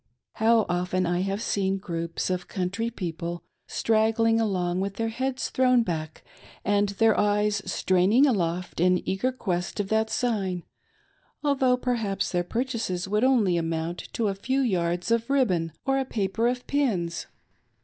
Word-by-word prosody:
How 225 -1 +4
often 180 +1 0
I 175 +1 0
have 195 +3 -2
seen 195 -3 0
groups 170 -2 -3
of 180 -1 -2
country 195 +5 -2
people 170 -5 -5 0.2
straggling 225 +1 +2
along, 180 -4 0
with 195 0 -3
their 225 +1 -1
heads 260 +3 -2
thrown 255 -2 +4
back 160 -5 -4 0.4
and 205 0 +2
their 220 +2 +3
eyes 210 0 +2
straining 190 +10 +3
aloft 180 - -1
in 180 +1 +2
eager 195 +7 0
quest 180 -7 -3
of 200 -1 -1
that 220 0 +1
sign, 195 -9 -1 0.8
although 265 -3 +3
perhaps 230 -6 -1
their 175 -1 +1
purchases 225 -4 -2
would 210 +3 +1
only 225 -9 +3
amount 165 +1 -2
to 225 - 0
a 200 - 0
few 260 +8 -1
yards 180 -4 0
of 230 +1 +1
ribbon 185 -13 +2
or 270 0 +2
a - - +1
paper 225 0 0
of 250 0 -2
pins 195 -13 -1
200 Hz, 150 wpm, -26 LUFS, 180-230 Hz, 0.8 s, How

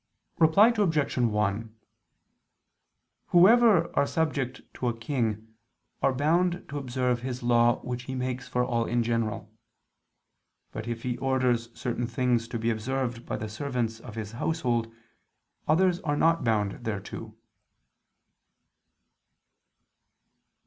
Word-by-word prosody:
Reply 200 +9 +6
Obj. 160 -12 +1
1: 110 -1 0 1.5
Whoever 195 -1 +5
are 140 - +3
subject 140 -6 -1
to 125 - -3
a 115 -1 -1
king, 115 -3 -2 0.5
are - - +3
bound 170 +6 +1
to 145 +1 -4
observe 125 -2 -1
his 125 -1 -5
law 120 0 +3
which 125 0 -5
he 130 - -5
makes 130 0 -3
for 125 0 0
all 120 -2 0
in 120 0 0
general. 115 -2 -2 1.2
But 110 +1 -6
if 115 -1 -4
he 125 -1 -2
orders 125 -3 +1
certain 120 0 -2
things 120 -1 0
to 115 - -4
be 115 +1 0
observed 120 +1 -3
by - - -2
the 110 - -5
servants 115 -1 -3
of 115 -2 -10
his 110 -2 -5
household, 120 -3 -1 0.8
others 175 +3 +3
are 145 -5 -1
not 165 +1 +3
bound 105 -4 0
thereto. 105 -3 -5
125 Hz, 120 wpm, -27 LUFS, 115-145 Hz, 1.5 s, Reply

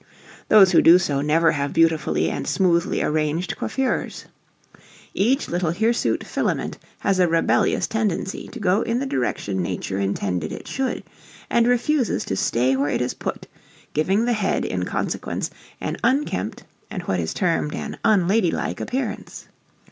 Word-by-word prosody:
Those 195 -4 +7
who 175 - +6
do 170 +2 +8
so 145 -7 0
never 160 +3 +3
have 140 -1 -2
beautifully 165 -3 +2
and - - -4
smoothly 175 -3 +1
arranged 155 +3 -1
coiffures. 265 -1 -2 0.9
Each 250 +8 +1
little 175 -2 0
hirsute 225 +6 +1
filament - - -2 0.2
has 195 -2 +1
a 180 - +5
rebellious 165 0 +2
tendency 210 -4 -2
to 245 - -9
go 195 +1 +2
in 230 +1 -1
the 270 - -1
direction 110 - -2
nature 95 +2 -3
intended 95 -4 -2
it - - -8
should, 265 -1 -2 0.5
and 235 0 +3
refuses 245 +2 +1
to 95 - -2
"stay 125 +6 +1
where 140 +2 0
it - - 0
is 125 - -2
put," - - -5 0.5
giving 190 +9 +1
the 245 - +2
head 215 -3 0
in - - -2
consequence, - - -3 0.3
an - - -3
unkempt 265 +5 0 0.3
and 180 - -5
what 95 - -1
is 80 -1 -2
termed 165 -4 0
an - - -5
"unladylike" 195 -2 +2
appearance. 250 -3 -4
180 Hz, 150 wpm, -22 LUFS, 145-220 Hz, 0.9 s, do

